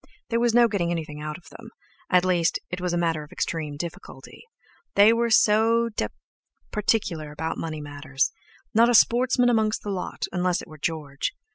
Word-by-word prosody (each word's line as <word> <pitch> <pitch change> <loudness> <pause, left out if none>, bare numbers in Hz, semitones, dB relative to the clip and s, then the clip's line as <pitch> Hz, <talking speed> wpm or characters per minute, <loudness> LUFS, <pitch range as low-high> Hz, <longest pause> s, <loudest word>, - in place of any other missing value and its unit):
There 230 - +2
was 235 -1 +2
no 240 -1 +6
getting 195 -6 -1
anything 155 -3 -4
out 150 0 -5
of 180 - -19
them—at 205 -5 -3
least, 175 -2 +2
it 180 0 -4
was 180 -1 -1
a 175 - 0
matter 165 -2 0
of 150 - -15
extreme 150 -3 -3
difficulty. 170 +2 -8 0.5
They 205 +3 +7
were 235 0 +1
so 225 +2 +4
d— 210 - -2
d - - -28 0.6
particular 185 -8 -1
about 160 +2 -4
money 155 -2 -4
matters; 145 -1 -2 0.4
not 230 +2 +5
a 245 - +4
sportsman 245 +2 +4
amongst 220 -2 +1
the 205 - -3
lot, 185 -2 -5
unless 180 -1 0
it - - -9
were 155 -2 -13
George. 150 -3 -3
180 Hz, 180 wpm, -25 LUFS, 155-225 Hz, 0.6 s, They